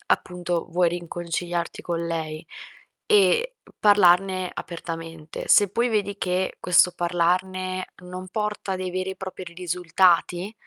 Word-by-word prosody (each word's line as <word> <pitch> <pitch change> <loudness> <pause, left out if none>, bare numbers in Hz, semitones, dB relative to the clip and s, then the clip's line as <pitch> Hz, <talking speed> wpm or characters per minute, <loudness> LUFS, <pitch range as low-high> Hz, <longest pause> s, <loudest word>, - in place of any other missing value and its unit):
appunto, 175 -1 -1
vuoi 175 0 +2
riconciliarti 175 0 -4
con 170 -1 -3
lei, 160 -1 -4 0.6
e 470 +3 +3 0.2
parlarne 185 -2 +4
apertamente. 165 -2 -7
Se, 205 - +6
poi, 235 +6 0
vedi 205 -3 -1
che 185 0 -1
questo 180 0 +5
parlarne 185 +2 -1
non 180 +1 -8
porta 210 -1 -2
dei 185 0 -3
veri 185 +1 -2
e 190 - -7
propri 190 0 -7
ri 170 -1 -11
risultati, 180 +2 +1
180 Hz, 125 wpm, -24 LUFS, 175-190 Hz, 0.6 s, Se